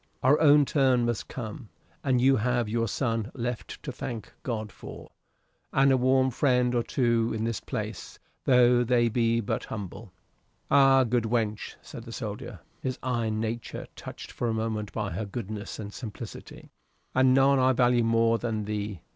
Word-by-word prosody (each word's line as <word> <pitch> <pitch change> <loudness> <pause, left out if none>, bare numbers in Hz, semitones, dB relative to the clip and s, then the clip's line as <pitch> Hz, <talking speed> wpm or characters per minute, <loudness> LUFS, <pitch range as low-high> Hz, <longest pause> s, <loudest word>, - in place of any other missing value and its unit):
Our 135 +4 +5
own 145 -1 +6
turn 130 -4 +2
must 120 -2 -2
come. 110 -2 -7 0.3
And 130 -4 +2
you 135 +2 +4
have 120 +1 0
your 115 +1 0
son 115 +1 -1
left 120 -2 -5
to - - -4
thank 115 -5 -6
God 110 -4 -4
for, - - -11 0.6
and 135 0 +4
a - - +5
warm 130 +1 +3
friend 125 -1 +2
or 120 - +2
two 115 -1 +1
in 110 - -2
this 115 -2 -1
place, - - -6 0.3
tho' 125 -1 +5
they 120 -1 +3
be 115 0 +1
but 100 - -3
humble." 105 0 -7 0.6
"Ay, 135 -1 +6
good 120 0 +1
wench," 110 -2 -1
said - - -9
the 115 - -10
soldier, 110 -2 -6 0.2
his 130 -1 -3
iron 115 -4 -1
nature 115 +1 -4
touched - - -9
for 120 - -3
a 115 - 0
moment 110 -2 -2
by 105 -3 -3
her 110 - -3
goodness 105 -1 -6
and 105 -1 -7
simplicity, 110 -5 -9 0.4
"and 130 0 +4
none 135 0 +5
I 130 0 +4
value 120 -1 +3
more 115 0 +3
than 110 -3 -2
thee. 105 -3 -4
120 Hz, 170 wpm, -27 LUFS, 110-130 Hz, 0.6 s, own